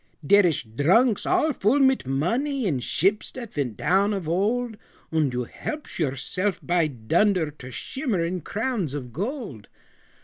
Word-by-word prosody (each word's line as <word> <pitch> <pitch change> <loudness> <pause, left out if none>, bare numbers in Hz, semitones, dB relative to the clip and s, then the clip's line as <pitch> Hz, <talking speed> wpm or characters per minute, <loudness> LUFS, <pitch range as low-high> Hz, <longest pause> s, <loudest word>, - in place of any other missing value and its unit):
"Dere 200 +4 +6
ish 160 -7 0
drunks 175 - +2
all 360 -5 +2
full 240 +5 +2
mit 265 - +3
money 235 - 0
In 150 -9 0
ships 195 - +1
dat 235 -4 -8
vent 125 -8 -2
down 200 +3 +2
of 190 -5 -4
old; 220 +7 0 0.4
Und 155 -4 +1
you 125 0 -2
helpsh 300 - -6
yourself, 165 +7 -1
by 175 -2 +2
dunder! 160 - +1
To 140 -3 -12
shimmerin 185 - -2
crowns 210 - -2
of 125 -5 -6
gold. 200 - -5
185 Hz, 145 wpm, -25 LUFS, 145-230 Hz, 0.4 s, Dere